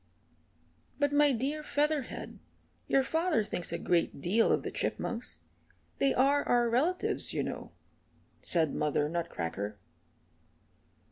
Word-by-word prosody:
"But, 285 0 +1
my 290 0 +5
dear 275 +5 -1
Featherhead, 295 -2 -1 0.5
your 270 - +3
father 320 -4 +1
thinks 175 -5 -2
a 170 - -1
great 170 -5 0
deal 205 +10 +3
of - - +2
the - - -4
Chipmunks 240 +1 -3 0.6
they 275 - +3
are 280 +3 +3
our 240 -1 +2
relatives 320 +10 0
you - - +1
know," - - -6 0.7
said 160 -4 +1
Mother 150 0 +1
Nutcracker. 105 - -3
245 Hz, 120 wpm, -31 LUFS, -, 0.7 s, my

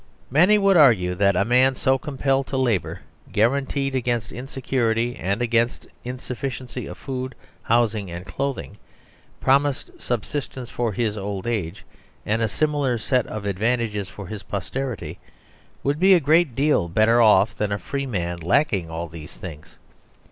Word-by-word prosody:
Many 180 +10 +5
would 195 -2 +4
argue 110 - +5
that 100 +1 +2
a 100 - +2
man 130 +3 +4
so 130 +1 +2
compelled 135 -1 0
to 135 - -3
labour, 120 -8 0 0.3
guaranteed 135 +4 +1
against 120 -4 -1
insecurity 120 -2 -1
and 100 +6 -1
against 120 0 +1 0.2
in 125 +1 -5
sufficiency 125 -1 -5
of - - -8
food, 130 -1 -5 0.3
housing 110 -4 +1
and 85 +2 -7
clothing, 135 -6 -4 0.6
promised 140 0 +2
subsistence 125 +1 -4
for 120 -2 -1
his 105 0 -1
old 100 -1 -4
age, 105 -6 -3 0.4
and 110 +2 0
a 110 - +2
similar 145 0 0
set 125 +2 0
of 110 -2 -6
ad 100 -2 -2
vantages 110 -4 0
for 100 - -9
his 105 +2 -7
posterity, 120 +4 -4 0.6
would 145 +2 0
be 190 +1 +7
a - - +5
great 155 -3 +3
deal 140 - +2
better 110 +6 +4
off 105 -2 +5
than 105 -1 -2
a 100 - 0
free 140 +8 -4
man 85 -7 -3
lacking 95 - +1
all 80 +1 -4
these 80 -2 -10
things. 80 -4 -10
120 Hz, 155 wpm, -23 LUFS, 100-135 Hz, 0.6 s, be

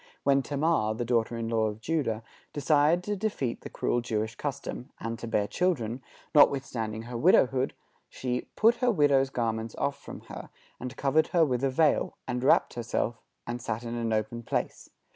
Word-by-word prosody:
When 140 0 +4
Tamar, 140 -6 +1
the 120 +1 -3
daughter 115 -1 +1
in 115 -1 -3
law 115 -1 +1
of 105 0 -5
Judah, 115 -5 -1 0.3
desired 150 +3 +3
to 205 +2 -2
defeat 190 - -2
the - - -8
cruel 120 - 0
Jewish 110 -1 -2
custom, 140 0 -5
and 115 0 -4
to 120 - -6
bear 105 -2 +1
children, 130 - -1 0.3
notwithstanding 120 -7 +3
her 120 +1 -7
widowhood, 130 -2 +3 0.3
she 125 -1 -3
"put 230 +3 +4
her 250 0 +2
widow's 145 - +3
garments 115 -3 -2
off 140 0 -2
from - - -9
her, - - -9 0.3
and 125 0 -6
covered 150 +3 +2
her 170 -2 +3
with 130 -2 -1
a 135 - +3
veil, 150 +3 +2
and 125 -1 -2
wrapped - - +4
herself, 120 -1 -2 0.2
and 120 +1 -4
sat 115 0 -3
in 115 0 -5
an 115 -1 -2
open 110 +2 -1
place.... - - -3
125 Hz, 180 wpm, -28 LUFS, 115-145 Hz, 0.3 s, When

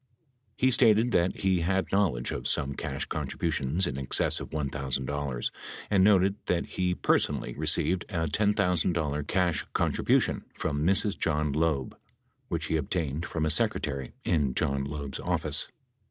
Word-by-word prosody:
He 130 +1 +3
stated 115 -1 +5
that 90 -2 +1
he 95 -2 +2
had 95 +3 0
knowledge 90 -12 +1
of - - -3
some 70 -1 +1
cash - - -4
contributions 80 +2 -1
in 70 -5 -3
excess 65 - +2
of - - -7
$1,000 70 -2 -3 0.4
and 95 -2 +4
noted 100 0 +4
that 85 -1 0
he 90 -1 -1
personally - - 0
received 90 +7 +1
a 80 -2 -1
$10,000 85 -5 +1
cash 90 -3 +1
contribution - - +1
from 75 -1 -2
Mrs. 100 +3 +3
John 75 -2 0
Loeb, 75 -4 0 0.5
which - - -3
he 80 - 0
obtained 80 +1 -2
from 80 -1 -2
a 80 - +1
secretary 70 -3 -1
in 70 -6 +1
John 70 0 0
Loeb's 70 -1 -5
office. - - 0
80 Hz, 140 wpm, -28 LUFS, 70-95 Hz, 0.5 s, stated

